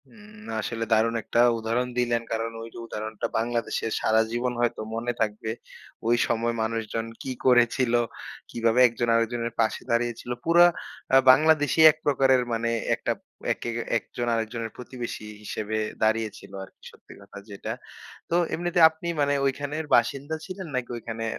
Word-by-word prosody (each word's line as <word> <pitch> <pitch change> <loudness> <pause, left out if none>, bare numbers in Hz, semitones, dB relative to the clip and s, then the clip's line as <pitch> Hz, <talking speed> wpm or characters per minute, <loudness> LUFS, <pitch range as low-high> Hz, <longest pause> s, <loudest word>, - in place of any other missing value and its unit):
হু, - - -24 0.5
আসলে 115 0 -3
দারুণ 110 +1 +3
একটা 120 - -1 0.2
উদাহরণ 115 +3 -1
দিলেন। 120 -1 +1
কারণ 115 0 -1
ওই 115 - -7
যে - - -11
উদাহরণটা, 110 0 -5
বাংলাদেশের 115 -1 -1
সারা 110 0 +3
জীবন 120 +1 -1
হয়তো 120 -2 0
মনে 120 +2 -1
থাকবে, 110 0 -1 0.6
ওই 120 - +4
সময় 115 0 0
মানুষজন 115 0 -2 0.2
কি 135 - -4
করেছিল, 125 -1 +4 0.6
কিভাবে 115 +1 +1
একজন 120 0 -2
আরেকজনের 115 0 -1
পাশে 110 - 0
দাঁড়িয়েছিল? 120 0 -1
পুরা 170 +1 +7 0.5
আ - - +9
বাংলাদেশী 155 +1 +3
এক 155 - -15
প্রকারের 135 -3 +3
মানে, 115 0 0 0.3
একটা - - -2 0.4
একে - - -6 0.3
একজন 120 +1 -5
আরেকজনের 115 0 -3
প্রতিবেশী 125 -3 -6 0.2
হিসেবে 110 +1 -4 0.3
দাঁড়িয়েছিল 110 0 -1
আরকি, 95 - -16
সত্যি - - -16
কথা 100 - -13
যেটা। 100 - -6 0.6
তো 170 - +1 0.2
এমনিতে 175 +1 -1
আপনি 160 +2 -9
মানে 145 0 +2
ঐখানের 145 +3 -2
বাসিন্দা 140 +6 +1
ছিলেন, 185 -1 -7
নাকি 125 -1 -2
ওইখানে 115 0 -5
120 Hz, 145 wpm, -26 LUFS, 115-130 Hz, 0.6 s, আ